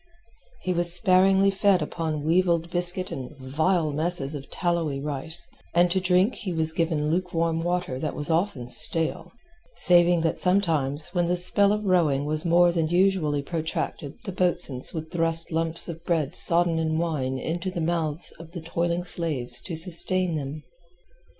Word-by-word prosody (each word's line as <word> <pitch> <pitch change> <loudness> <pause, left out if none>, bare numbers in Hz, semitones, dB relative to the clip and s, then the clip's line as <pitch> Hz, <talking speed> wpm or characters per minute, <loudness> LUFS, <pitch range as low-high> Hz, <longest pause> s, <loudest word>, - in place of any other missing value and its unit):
He 185 - -1
was 175 0 +2
sparingly 190 +1 +3
fed 195 -1 +2
upon 155 -3 -5
weevilled 170 0 0
biscuit 180 +1 0
and 130 -2 -8
vile 155 +5 -1
messes 155 -1 +4
of 140 -2 -9
tallowy 170 -6 -2
rice, 150 +4 -3 0.3
and 175 0 +3
to 190 - +1
drink 185 +5 +1
he 190 - -7
was 160 -1 -1
given 160 -2 -1
luke 180 +1 -3
warm 165 0 -1
water 175 -6 -3
that 155 - -4
was 145 - -3
often 160 -7 -2
stale, 160 +6 +3 0.4
saving 175 -1 +3
that 160 -1 -2
sometimes 160 -7 0
when 175 -2 0
the 180 +1 -1
spell 200 +3 +3
of 210 0 -3
rowing 160 -7 +1
was 155 +1 -3
more 175 +1 +3
than 165 -2 -1
usually 175 -5 0
protracted 160 -2 -5
the 205 - -6
boatswains 175 -8 +2
would 160 -1 -7
thrust 165 -1 0
lumps 165 0 0
of 165 -1 -9
bread 165 -3 -1
sodden 170 -1 +4
in 160 -1 -2
wine 145 -6 -3
into 170 +7 -4
the 180 - -6
mouths 165 -1 -3
of 165 0 -13
the 175 - -7
toiling 170 +1 -3
slaves 140 -9 +2
to 170 - -7
sustain 180 +2 +2
them. 150 0 -6
170 Hz, 165 wpm, -24 LUFS, 155-180 Hz, 0.4 s, messes